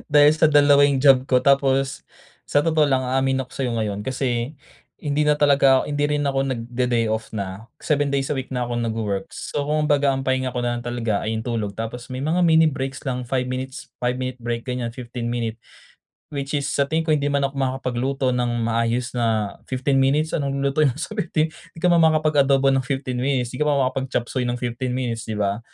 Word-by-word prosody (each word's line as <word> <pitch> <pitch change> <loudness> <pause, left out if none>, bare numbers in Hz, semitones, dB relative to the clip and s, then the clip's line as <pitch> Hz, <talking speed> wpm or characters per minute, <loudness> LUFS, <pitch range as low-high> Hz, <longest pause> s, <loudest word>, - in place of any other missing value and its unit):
Dahil 145 0 +7
sa 155 0 +3
2 145 -1 +6
yung 135 -2 0
job 135 -2 +5
ko 125 -1 +3
tapos, 135 0 +2 0.4
sa 145 - +3
totoo 155 -2 +3
lang 130 -1 +1
aamin 130 +1 +1
ako 125 - -26
sa'yo 130 -2 -2
ngayon 105 -2 -2
kasi 130 0 -2 0.5
hindi 150 0 0
na 150 - +4
talaga, 140 -2 +4
hindi 145 0 -1
rin 150 0 0
ako 135 -1 0
nagde-day 120 -2 -1
off 110 0 -3
na. 100 +1 -5 0.2
7 145 -2 +1
days 140 0 -1
a - - +1
week 130 0 -5
na 125 - -1
ako 120 0 -2
nag-work 110 -4 -2
so 145 - -3
kumbaga 150 -2 +2
ang 135 - -3
pahinga 130 -1 0
ko 125 - -2
na 120 0 -1
lang - - -7
talaga 115 -4 -1
ay 110 - -1
yung 110 - -3
tulog. 110 -4 -2
Tapos 115 +3 -6
may 130 - -4
mga 160 +5 0
mini 160 0 +5
breaks 135 -1 -5
lang 125 -2 -3
5 125 0 -1
minutes, 130 +1 -5
5 125 0 0
minute 130 0 -4
break 120 -1 -3
ganyan 125 -2 -3
15 120 -1 -6
minute. 115 -1 -3 0.8
Which 140 +1 -3
is 140 - -2
sa 140 -1 +1
tingin 160 +1 +1
ko 155 - +1
hindi 145 -1 +1
man 140 -1 +1
ako 135 - -4
makakapagluto 130 0 -1
ng 120 -1 -1
maayos 115 +2 0
na 110 -4 0
15 135 +1 +1
minutes, 150 +4 +2
anong 140 -3 -1
lulutuin 140 +1 +2
mo 120 - -10
sa 190 - -5
15 160 -5 0
'di 165 +1 -16
ka 180 - +2
naman 165 -2 +5
makakapag-adobo 140 -3 +3
ng 135 - +2
15 135 -2 -3
minutes. 130 -3 0
Di 125 - -6
ka - - +5
naman 140 -3 +2
makakapag-chapsuey 130 -1 -2
ng 120 0 -1
15 125 +1 -3
minutes 120 -3 -3
'di 110 - -2
ba? 100 +1 0
130 Hz, 210 wpm, -22 LUFS, 120-140 Hz, 0.8 s, Dahil